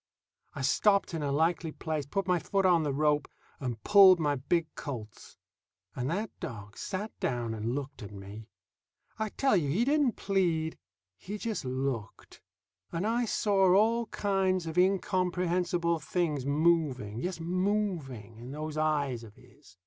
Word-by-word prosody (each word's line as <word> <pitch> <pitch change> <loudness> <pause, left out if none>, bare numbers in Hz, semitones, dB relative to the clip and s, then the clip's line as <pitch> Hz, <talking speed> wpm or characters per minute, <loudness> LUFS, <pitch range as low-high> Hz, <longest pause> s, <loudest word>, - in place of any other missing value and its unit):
I 140 - -4
stopped 200 +9 +3
in 160 - -2
a 145 -1 -1
likely 160 +2 +1
place, 155 -3 -4
put 195 +6 -1
my 180 -1 +2
foot 195 +3 0
on 175 -3 +5
the 150 -2 -1
rope, 150 +1 +1 0.3
and 120 -5 -4
pulled 195 -3 +8
my 150 -2 +1
big 160 +5 0
Colt's. 115 -7 -8 0.6
And 125 +2 -2
that 205 +5 -2
dog 105 -3 -7
sat 205 +3 -4
down 120 -3 -1
and 110 +3 -2
looked 145 -1 -5
at 105 - -8
me. 100 +2 -10 0.7
I 220 0 -1
tell 270 +2 +2
you 155 -7 +1
he 200 +12 +2
didn't 285 -3 +3
plead. 170 -6 0 0.4
He 205 +3 -6
just 215 - -3
looked. 130 -4 -4 0.5
And 170 +4 -2
I 235 +2 +1
saw 195 -4 +3
all 225 +3 +3
kinds 190 -4 0
of 160 -1 -5
incomprehensible 180 -2 +1
things 155 -3 -1
moving, 145 -8 +1
yes, 180 +5 -3
moving, 170 - -2
in 120 +2 -9
those 155 +1 -5
eyes 145 -6 0
of 105 -2 -13
his. 90 - -20
165 Hz, 155 wpm, -30 LUFS, 135-190 Hz, 0.7 s, pulled